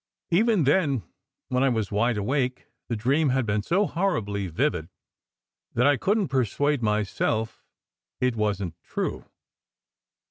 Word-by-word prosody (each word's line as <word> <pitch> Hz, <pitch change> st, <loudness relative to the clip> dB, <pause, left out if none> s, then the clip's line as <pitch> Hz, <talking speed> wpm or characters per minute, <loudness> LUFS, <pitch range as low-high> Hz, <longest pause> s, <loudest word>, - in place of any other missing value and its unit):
Even 210 Hz, 0 st, +3 dB
then, 140 Hz, -, +2 dB, 0.5 s
when 125 Hz, 0 st, +1 dB
I 135 Hz, -, +4 dB
was 110 Hz, -5 st, -1 dB
wide 115 Hz, +3 st, +1 dB
awake, 125 Hz, +4 st, -1 dB, 0.2 s
the 120 Hz, -, 0 dB
dream 135 Hz, +7 st, +2 dB
had 130 Hz, -1 st, +1 dB
been 105 Hz, -1 st, 0 dB
so 185 Hz, -, +2 dB
horribly 110 Hz, -, -1 dB
vivid 80 Hz, 0 st, -1 dB, 0.9 s
that 120 Hz, -, +3 dB
I 145 Hz, 0 st, +5 dB
couldn 205 Hz, +9 st, +1 dB
t -, -, -10 dB
persuade 135 Hz, +2 st, +1 dB
myself 110 Hz, +1 st, -1 dB, 0.6 s
it 125 Hz, -2 st, +1 dB
wasn 100 Hz, -4 st, -1 dB
t 80 Hz, -, -33 dB
true. -, -, -3 dB
125 Hz, 140 wpm, -26 LUFS, 105-145 Hz, 0.9 s, I